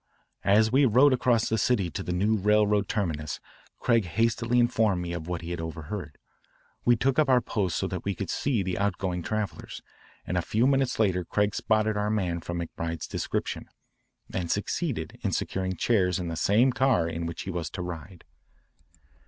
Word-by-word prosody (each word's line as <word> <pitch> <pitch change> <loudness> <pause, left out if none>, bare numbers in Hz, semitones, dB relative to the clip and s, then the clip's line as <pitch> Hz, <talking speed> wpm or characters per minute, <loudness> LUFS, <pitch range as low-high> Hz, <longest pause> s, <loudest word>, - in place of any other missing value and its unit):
As 110 +3 +4
we 135 +2 +5
rode 130 +5 +5
across 120 -3 +2
the 110 - 0
city 100 -6 +1
to - - -4
the - - -4
new 100 +5 +2
railroad 105 0 +2
terminus 80 -8 -2 0.4
Craig 115 -4 +2
hastily 115 +5 +1
informed 110 -5 +3
me 85 0 -4
of 85 -1 -5
what 90 -1 -3
he 85 - -5
had 85 -1 -3
overheard. 80 0 -6 0.7
We 120 - +5
took 130 +5 +1
up 150 -3 +3
our 130 -1 +6
post 100 -7 -1
so - - -1
that - - -4
we - - -2
could - - -4
see 125 -8 0
the 95 0 -2
outgoing 95 -3 -1
travellers, 105 +2 -4 0.4
and 90 - -2
a - - +3
few 110 +7 +1
minutes 135 -1 +2
later 95 -5 +2
Craig 105 +4 0
spotted 110 -1 +1
our 105 0 0
man 90 -6 -1
from 85 +1 -4
McBride's 85 0 -4
description, - - -3 0.6
and 90 -2 -2
succeeded 105 - -2
in - - -1
securing 95 -1 -2
chairs 90 -2 +2
in 90 -2 -3
the 85 - -3
same 110 +10 +3
car 125 -11 +2
in 85 0 -3
which 85 - -5
he 95 - -4
was 85 -3 -3
to 90 - -5
ride. 90 +1 -8
100 Hz, 185 wpm, -27 LUFS, 85-115 Hz, 0.7 s, our